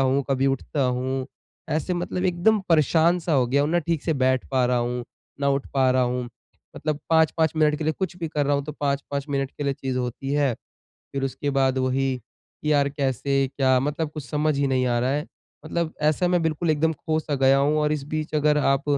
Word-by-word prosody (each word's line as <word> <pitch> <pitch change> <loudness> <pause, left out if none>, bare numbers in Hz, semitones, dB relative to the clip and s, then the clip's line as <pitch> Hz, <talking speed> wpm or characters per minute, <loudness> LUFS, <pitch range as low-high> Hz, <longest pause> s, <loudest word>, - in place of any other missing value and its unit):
हूँ, 135 +1 +2
कभी 135 0 +2
उठता 135 +1 -1
हूँ, 130 +1 -1 0.4
ऐसे 160 +4 -1
मतलब 180 +1 -3
एकदम 185 +4 +2
परेशान 165 +2 +4
सा 170 -1 -2
हो 130 -4 +3
गया 140 +3 +2
हूँ, 150 - 0
ना 175 - +3
ठीक 165 -2 -1
से 160 - 0
बैठ 130 -1 +1
पा 130 -2 +2
रहा 125 0 +1
हूँ, 120 0 -2 0.4
ना 140 - +2
उठ 140 0 0
पा 130 -1 +4
रहा 130 0 +3
हूँ। 125 0 -1 0.5
मतलब 150 -1 -2
5-5 160 0 +3
मिनट 150 -1 +3
के 155 - -3
लिए 155 - +1
कुछ 190 -2 -3
भी 165 -2 -4
कर 150 -2 -1
रहा 145 - +2
हूँ, 140 - -2
तो 150 - -6
5-5 140 0 -2
मिनट 135 -1 -1
के 145 - -6
लिए 140 - +1
चीज़ 130 -1 -3
होती 125 +2 -3
हैं, 145 -4 +2 0.6
फिर 135 -1 -2
उसके 140 +2 -2
बाद 135 -1 +2
वही, 130 0 0 0.5
कि 150 - +1
यार 140 -1 +3
कैसे, 135 -1 0
क्या? 130 -2 +4
मतलब 150 +3 -2
कुछ 150 -3 -6
समझ 150 -1 +1
ही 140 0 +1
नहीं 130 -1 +1
आ 120 -1 +1
रहा 125 +2 +1
है। 150 +2 -1 0.4
मतलब 165 0 -2
ऐसा 155 +4 +2
मैं 175 -1 +2
बिल्कुल 160 +1 -1
एकदम 160 +1 +1
खो 155 +1 -2
सा 150 -2 -3
गया 135 0 +4
हूँ 145 +2 +2
और 150 0 +1
इस 150 -2 -2
बीच 155 +1 -4
अगर 150 0 +3
आप 135 -1 +2
140 Hz, 230 wpm, -24 LUFS, 135-155 Hz, 0.6 s, परेशान